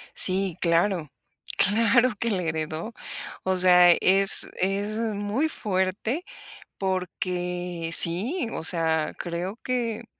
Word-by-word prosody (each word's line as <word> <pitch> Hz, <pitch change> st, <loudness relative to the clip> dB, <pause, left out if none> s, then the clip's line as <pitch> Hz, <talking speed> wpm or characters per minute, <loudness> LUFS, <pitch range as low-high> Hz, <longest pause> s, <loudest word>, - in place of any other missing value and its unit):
Sí, 185 Hz, -2 st, +1 dB
claro, 170 Hz, 0 st, +1 dB, 0.5 s
claro 230 Hz, +4 st, +3 dB
que 230 Hz, -, -1 dB
le 185 Hz, -5 st, -2 dB
heredó. 160 Hz, +6 st, -4 dB, 0.5 s
O 190 Hz, 0 st, 0 dB
sea, 180 Hz, -1 st, +6 dB
es 195 Hz, +3 st, +2 dB
es 200 Hz, +3 st, -2 dB
muy 220 Hz, +7 st, -2 dB
fuerte 205 Hz, -, -3 dB, 0.5 s
porque 180 Hz, -2 st, -4 dB
sí, 225 Hz, -, +6 dB
o -, -, -5 dB
sea, 160 Hz, -2 st, 0 dB
creo 175 Hz, +5 st, -5 dB
que 240 Hz, -3 st, -3 dB
190 Hz, 105 wpm, -24 LUFS, 175-215 Hz, 0.5 s, sea